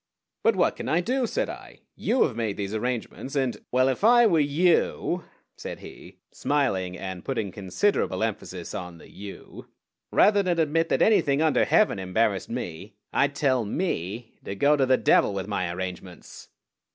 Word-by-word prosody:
"But - - +4
what - - +2
can - - -5
I 165 - +3
do?" 250 +7 0
said - - -1
I. - - -10
"You 255 - +2
have 130 - -1
made 110 -4 -2
these 100 0 -4
arrangements, 125 +4 -4
and 130 -6 -1
" - - -61
"Well, 130 +1 +3
if 135 +7 -1
I 240 +2 +7
were 170 -7 +4
you," 170 +3 +1 0.3
said - - -6
he, - - -12
smiling, 95 -11 -1
and 95 -2 -6
putting 115 -7 -3
considerable 95 - 0
emphasis 95 -5 -4
on 90 -4 -6
the - - -16
you, 100 0 -10 0.4
"rather 205 0 +5
than 180 -3 0
admit 165 +1 +1
that - - +3
anything 145 -10 +3
under 155 -1 +3
heaven 210 - +3
embarrassed 95 +1 0
me 90 +5 -6 0.2
I'd 140 0 +2
tell 130 -4 +2
me 110 - -3
to 100 - -5
go 145 +8 +4
to 135 -2 +1
the 130 0 +4
devil 100 - +3
with 95 -2 -3
my 90 -4 -2
arrangements." 90 0 -8
125 Hz, 175 wpm, -26 LUFS, 95-160 Hz, 0.4 s, I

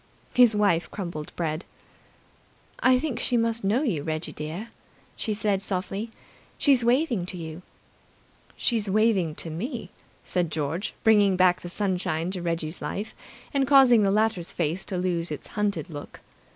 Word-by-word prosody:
His 245 -3 +6
wife 200 -5 +2
crumbled 170 -6 -6
bread. 160 0 -2 1.2
"I 255 0 +5
think 255 -3 -2
she 245 - +1
must 230 -1 0
know 220 +9 +2
you, 190 - 0
Reggie 155 +2 -3
dear," 165 +9 -6 0.5
she 220 - -3
said 205 -2 0
softly. 195 +3 -3 0.5
"She's 270 -4 +4
waving 240 - +2
to 180 - -1
you." 160 0 -7 1.0
"She's 220 -4 0
waving 195 -6 +2
to 165 - -5
me," 215 - -5 0.3
said 175 -2 -1
George, 155 +5 -2
bringing 205 -3 +5
back 185 -1 +4
the 175 - -7
sunshine 180 -3 -1
to 185 -2 -4
Reggie's 165 -1 -3
life, 210 +2 -4 0.4
and 275 -2 +2
causing 265 -5 +7
the 200 - +3
latter's 210 -4 +1
face 170 +2 -1
to 185 - -4
lose 175 -2 -1
its 150 - -7
hunted 210 -2 -1
look. 145 -4 -9
195 Hz, 150 wpm, -26 LUFS, 170-225 Hz, 1.2 s, causing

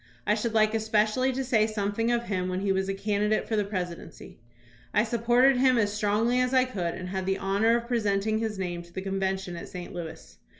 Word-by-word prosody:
I 210 - +3
should 225 +1 -2
like 215 0 +4
especially 220 +3 +1
to 265 +1 -2
say 225 -4 +2
something 215 +2 -1
of 235 0 +1
him 185 -5 -2
when 185 +1 -2
he 200 -1 +1
was 190 0 0
a - - 0
candidate 210 +1 0
for 225 - -1
the 210 - +2
presidency. 180 -5 -6 0.6
I 210 - +5
supported 240 +3 +3
him 255 -1 +4
as 205 -2 +1
strongly 215 +4 +1
as 250 +1 +1
I 255 0 +5
could, 185 -9 -3
and 180 -1 -6
had 190 0 -3
the 195 0 +1
honor 200 +5 +2
of 235 0 -6
presenting 215 -2 0
his 220 -2 -3
name 175 -2 -3
to 170 0 -16
the 190 +2 -5
convention 190 -2 -2
at 170 - -8
St. 180 -1 -8
Louis. 170 -3 -8
210 Hz, 220 wpm, -27 LUFS, 190-230 Hz, 0.6 s, I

